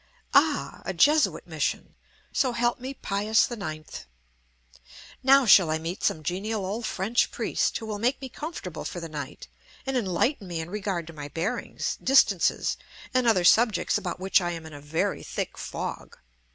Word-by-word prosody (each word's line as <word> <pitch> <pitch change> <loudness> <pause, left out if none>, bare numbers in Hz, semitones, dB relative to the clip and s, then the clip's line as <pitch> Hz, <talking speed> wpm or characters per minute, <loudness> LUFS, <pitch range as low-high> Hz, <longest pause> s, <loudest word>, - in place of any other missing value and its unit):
Ah! 295 +1 +2
a 190 - -3
Jesuit 295 - +3
mission, - - -2 0.4
so 255 -3 +1
help 240 +1 +1
me 260 +2 -6
Pius 215 +2 +1
IX! 155 -9 -5 1.4
now 270 0 +6
shall 190 -6 +7
I 155 - +1
meet 165 +4 -5
some 155 - +1
genial 195 +5 -2
old 215 +4 -3
French 215 +6 +1
priest, - - -1
who 225 - -7
will 210 -2 -4
make 250 +5 +1
me 265 - -6
comfortable 245 - -6
for 175 - -5
the 165 - -6
night 150 -3 -7 0.4
and 270 0 -2
enlighten 205 - 0
me 170 -2 -4
in 160 +2 -6
regard 195 -5 -2
to 165 - -10
my 145 -2 -7
bearings, 165 +7 -3
distances, 270 +1 +3 0.4
and 255 -1 +2
other 200 -6 +4
subjects 220 +2 +4
about - - -2
which 190 +1 +3
I 175 -1 -2
am 165 -1 -7
in 160 - -10
a 145 - -9
very 150 +3 -1
thick - - -4
fog. - - -6
200 Hz, 170 wpm, -26 LUFS, 170-245 Hz, 1.4 s, shall